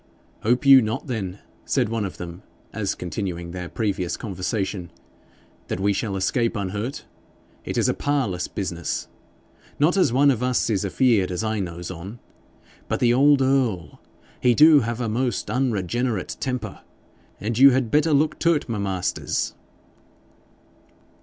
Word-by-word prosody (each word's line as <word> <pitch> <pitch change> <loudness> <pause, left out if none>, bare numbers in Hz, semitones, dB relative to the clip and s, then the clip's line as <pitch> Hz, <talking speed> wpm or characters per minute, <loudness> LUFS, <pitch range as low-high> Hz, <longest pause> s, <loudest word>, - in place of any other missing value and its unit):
'Hope 125 +5 +1
you 135 -1 +9 0.2
then,' 105 -8 -4 0.3
said - - +1
one 115 -2 -1
of 95 - -7
them, 85 +1 -8 0.3
as 105 -3 -2
continuing 85 -1 -5
their 90 0 -6
previous 100 -5 -2
conversation, 95 -2 -3 0.8
'that - - -3
we 100 +1 +2
shall 100 0 -2
escape 115 +5 0
unhurt? 105 +6 -4 0.6
It - - -3
is - - +2
a - - +2
parlous 130 -11 -1
business. 85 -4 -4 0.7
Not 160 +6 +3
as 185 - +3
one 140 +3 +4
of 125 -3 -2
us 125 -2 +1
is 100 -2 0
afeard 100 0 +2
as 90 +3 -3
I 110 -1 -1
knows 90 -1 -5
on. 95 +6 -8 0.7
But - - -1
the 120 -1 +3
old 140 +1 +5
earl, 120 - 0 0.4
he 125 -1 +3
do 155 +1 +7
have 120 -1 -3
a 120 - -1
most 120 +3 -1
unregenerate 120 -3 -1
temper, 125 -6 -4 0.6
and 110 +2 -2
you 140 +1 +10
had 130 -3 0
better 155 +2 +3
look 150 +1 +2
to't, 165 -3 +2
my 115 -3 -3
masters.' 95 -3 -2
110 Hz, 145 wpm, -23 LUFS, 95-130 Hz, 0.8 s, you